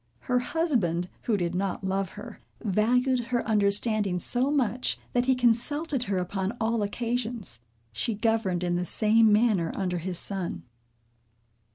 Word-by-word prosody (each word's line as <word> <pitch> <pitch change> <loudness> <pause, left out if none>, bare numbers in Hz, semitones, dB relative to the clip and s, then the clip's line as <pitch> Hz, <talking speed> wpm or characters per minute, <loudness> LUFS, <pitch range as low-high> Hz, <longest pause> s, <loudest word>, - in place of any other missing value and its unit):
Her 250 0 +1
husband, 235 - 0 0.2
who 220 -4 +2
did 175 -2 -1
not 190 +1 -2
love 190 -1 -1
her, 235 -3 -10 0.2
valued 245 +5 +2
her 240 0 -1
understanding 205 -2 +2
so 245 +8 +2
much, 255 -4 +1 0.2
that 245 +1 +1
he 260 - +4
consulted 250 +3 +1
her 195 -1 -1
upon 190 +4 -2
all 225 0 0
occasions. 230 - -2 0.3
She 160 - -2
governed 215 -5 0
in 175 0 0
the 180 - -1
same 220 +4 +3
manner 210 -6 +3
under 180 -2 -1
his 180 +1 -3
son. 190 -2 -3
215 Hz, 145 wpm, -27 LUFS, 190-245 Hz, 0.3 s, he